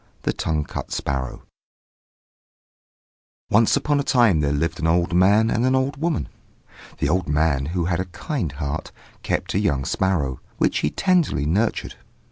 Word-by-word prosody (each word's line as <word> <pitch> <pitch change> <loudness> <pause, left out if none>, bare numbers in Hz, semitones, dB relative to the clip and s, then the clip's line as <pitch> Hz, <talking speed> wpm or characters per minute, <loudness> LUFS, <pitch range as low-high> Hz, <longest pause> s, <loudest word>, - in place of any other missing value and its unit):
THE - - 0
TONGUE 75 -1 -1
CUT - - -7
SPARROW 65 -2 -3 2.1
Once 110 +1 +4
upon 145 -1 +1
a - - 0
time 120 - +4
there 70 -1 +1
lived 75 +5 -1
an 80 - 0
old 85 +1 +2
man 100 +5 +4
and 115 - +1
an 130 +1 +3
old 135 +2 0
woman. 165 -2 0 0.7
The - - 0
old 90 +2 +1
man, 75 -2 +1
who 85 +1 -1
had 85 -1 0
a 95 - -1
kind 90 - -4
heart, 70 +1 -4 0.3
kept - - -2
a - - +2
young 65 -2 0
sparrow, 75 -10 0 0.2
which - - +1
he 75 - +1
tenderly 170 - +1
nurtured. 100 +9 -1
85 Hz, 160 wpm, -22 LUFS, 75-115 Hz, 2.1 s, Once